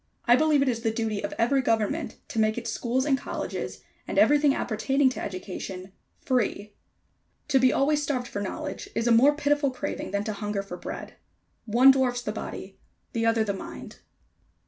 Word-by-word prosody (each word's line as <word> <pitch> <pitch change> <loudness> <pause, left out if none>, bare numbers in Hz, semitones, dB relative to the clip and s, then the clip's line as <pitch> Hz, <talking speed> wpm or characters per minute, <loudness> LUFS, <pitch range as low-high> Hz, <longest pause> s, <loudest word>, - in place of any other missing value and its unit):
I 240 - +6
believe 300 0 +3
it - - -2
is 235 -3 0
the 225 - +1
duty 220 -2 -2
of - - -3
every 270 +4 +2
government 230 +6 0
to 245 -6 -3
make 215 +1 +2
its 230 -1 -3
schools 250 +3 -1
and 285 -2 +3
colleges, - - -5 0.2
and - - -4
everything 295 -1 +5
appertaining 265 +3 +1
to - - -6
education 185 0 -6 0.3
FREE. 210 -5 -1 0.8
To 270 -2 +4
be 255 0 +5
always 295 +2 +2
starved 265 -4 -2
for 205 - -4
knowledge 205 - -5
is 230 - 0
a 240 - +3
more 265 +6 +6
pitiful 290 -1 +1
craving 255 - -5
than 200 +1 -1
to 215 - -3
hunger 205 -1 -3
for 195 -3 -7
bread. 175 - -8 0.5
One 240 +5 +7
dwarfs 250 -2 0
the 210 - -2
body; 195 -2 -7 0.3
the 230 -1 0
other 225 -1 +3
the 205 -2 -1
mind. 195 - -9
240 Hz, 185 wpm, -26 LUFS, 210-270 Hz, 0.8 s, One